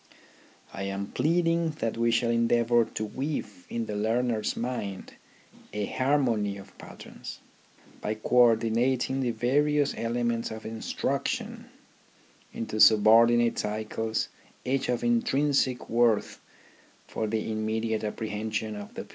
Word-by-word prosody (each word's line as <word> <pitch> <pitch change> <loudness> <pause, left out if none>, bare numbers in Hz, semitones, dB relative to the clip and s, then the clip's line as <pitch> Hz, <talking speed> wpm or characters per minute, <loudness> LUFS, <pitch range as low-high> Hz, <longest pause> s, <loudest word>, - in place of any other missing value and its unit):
I - - -6
am 100 +1 -4
pleading 165 +2 +1
that 115 - -1
we 115 0 +1
shall 115 0 +2
endeavour 115 0 +3
to 110 - -4
weave 110 - -5
in 115 -1 -2
the 105 - -5
learner's 110 +1 0
mind 115 -6 -4 0.6
a 105 -1 -1
harmony 120 -8 +1
of 100 0 -13
patterns, - - -10 0.6
by 105 - -2
co 110 +3 -1
ordinating 120 +3 +3
the 130 -2 0
vari 135 +6 +1
ous 145 -1 +2
elements 120 0 -1
of 110 0 -8
instruction 110 0 -3 0.9
into 110 -1 -4
subordinate 115 +2 +6
cycles 110 +1 -2 0.4
each 135 +1 0
of 120 -1 0
intrinsic 130 +2 +1
worth 115 -2 +1 0.6
for 110 - -3
the 110 +1 -2
immediate 110 0 -1
apprehension 110 0 -3
of 105 -1 -9
the - - -5
pupil. - - -21
115 Hz, 125 wpm, -27 LUFS, 110-125 Hz, 0.9 s, subordinate